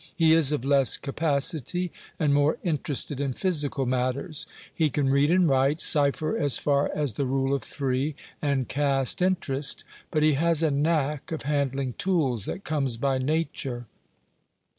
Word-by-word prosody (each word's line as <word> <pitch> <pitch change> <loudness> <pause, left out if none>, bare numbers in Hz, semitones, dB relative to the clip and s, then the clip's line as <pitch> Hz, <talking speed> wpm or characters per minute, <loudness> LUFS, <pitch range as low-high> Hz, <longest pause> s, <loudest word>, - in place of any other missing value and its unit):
He 160 -2 +4
is 160 -4 +5
of 145 -4 -2
less 140 -2 +3
capacity, 155 +3 -1 0.3
and 150 -3 +1
more 145 +2 +2
interested 145 -4 -1
in 135 -2 -1
physical 150 -6 -1
matters. 130 +5 -2 0.3
He 160 -2 +1
can 140 0 0
read 140 +2 +3
and 180 0 +4
write, 135 +2 +2
cipher 150 0 +2
as 145 -4 +2
far 140 -1 +1
as 145 -6 0
the 140 - -2
"rule 135 +1 0
of 140 - 0
three," 135 +2 -2 0.3
and 140 -4 0
cast 140 +1 +1
interest; 150 -7 +1 0.3
but 155 -1 0
he 155 0 +4
has 165 +2 +1
a 155 - +2
knack 150 +1 -1
of 160 - -4
handling 140 -2 -1
tools 140 - 0
that 195 - -5
comes 135 -6 -1
by 135 +1 0
nature. 135 -4 -2
145 Hz, 160 wpm, -26 LUFS, 135-155 Hz, 0.3 s, is